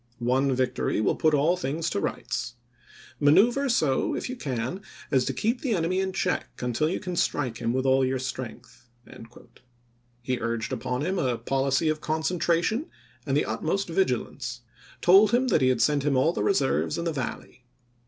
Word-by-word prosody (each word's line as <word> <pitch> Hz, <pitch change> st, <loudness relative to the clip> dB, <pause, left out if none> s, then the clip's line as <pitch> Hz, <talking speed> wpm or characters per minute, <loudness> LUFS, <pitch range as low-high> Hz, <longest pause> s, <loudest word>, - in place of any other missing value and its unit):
One 130 Hz, +2 st, +1 dB
victory 130 Hz, -4 st, 0 dB
will 110 Hz, -, +1 dB
put 155 Hz, -1 st, +2 dB
all 155 Hz, +5 st, +3 dB
things 160 Hz, -1 st, -3 dB
to -, -, -1 dB
rights... 120 Hz, -, -3 dB, 0.6 s
Manoeuvre 235 Hz, -, +4 dB
so, 150 Hz, -, +1 dB
if -, -, -4 dB
you -, -, -4 dB
can, 135 Hz, -, -4 dB, 0.3 s
as 130 Hz, -3 st, +3 dB
to -, -, 0 dB
keep 235 Hz, +3 st, -1 dB
the 245 Hz, -6 st, 0 dB
enemy 180 Hz, +2 st, 0 dB
in 190 Hz, 0 st, -1 dB
check 185 Hz, -1 st, -1 dB
until 125 Hz, +5 st, 0 dB
you 180 Hz, -, -2 dB
can 180 Hz, -1 st, -5 dB
strike 130 Hz, -8 st, -1 dB
him 115 Hz, 0 st, -1 dB
with 130 Hz, +2 st, -1 dB
all 135 Hz, 0 st, +4 dB
your 130 Hz, 0 st, 0 dB
strength." 120 Hz, -2 st, -7 dB, 1.3 s
He 125 Hz, 0 st, -1 dB
urged 115 Hz, +1 st, -2 dB
upon 125 Hz, +3 st, -2 dB
him 190 Hz, 0 st, -1 dB
a 125 Hz, -2 st, 0 dB
policy 135 Hz, +5 st, 0 dB
of 155 Hz, 0 st, 0 dB
concentration 170 Hz, -, 0 dB, 0.4 s
and 135 Hz, 0 st, +2 dB
the -, -, +1 dB
utmost 155 Hz, -, -2 dB
vigilance; 125 Hz, -7 st, -1 dB, 0.4 s
told 195 Hz, +4 st, +6 dB
him 255 Hz, +2 st, +3 dB
he 130 Hz, -, +3 dB
had 130 Hz, -2 st, +2 dB
sent 145 Hz, -1 st, +2 dB
him 140 Hz, -1 st, +1 dB
all 160 Hz, +6 st, +3 dB
the -, -, -2 dB
reserves 145 Hz, -9 st, +1 dB
in 170 Hz, -, -3 dB
the 165 Hz, -, -1 dB
Valley. 125 Hz, -2 st, -6 dB
140 Hz, 175 wpm, -26 LUFS, 125-175 Hz, 1.3 s, told